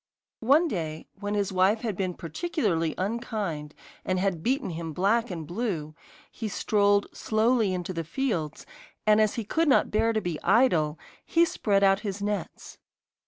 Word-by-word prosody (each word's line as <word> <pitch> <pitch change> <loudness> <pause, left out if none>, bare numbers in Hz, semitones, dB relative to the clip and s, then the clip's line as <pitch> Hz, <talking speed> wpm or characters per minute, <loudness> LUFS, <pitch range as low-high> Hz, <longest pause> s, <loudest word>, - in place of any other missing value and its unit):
One 285 +9 +4
day, 160 - -4
when 205 0 -2
his 200 -2 0
wife 190 +4 +3
had 225 -5 -2
been 185 -1 -2
particularly 170 - -1
unkind 195 -8 -3 0.3
and 185 - 0
had 185 -4 0
beaten 260 - 0
him 165 -1 -5
black 225 +8 +1
and 165 -4 -5
blue, 175 -5 -3 0.4
he 225 - -5
strolled 205 -1 +2
slowly 220 -1 +2
into 180 0 -3
the 165 -1 -3
fields, 170 - -2 0.4
and 215 0 +5
as 215 -1 +2
he 230 - -2
could 320 +10 0
not - - +5
endure 225 +2 +1
to 220 - +1
be 175 -6 -4
idle 175 -10 +3 0.3
he 335 +1 +3
spread 200 -10 +1
out 195 0 +5
his 205 -2 -4
nets. 200 -3 -4
200 Hz, 165 wpm, -27 LUFS, 170-225 Hz, 0.4 s, and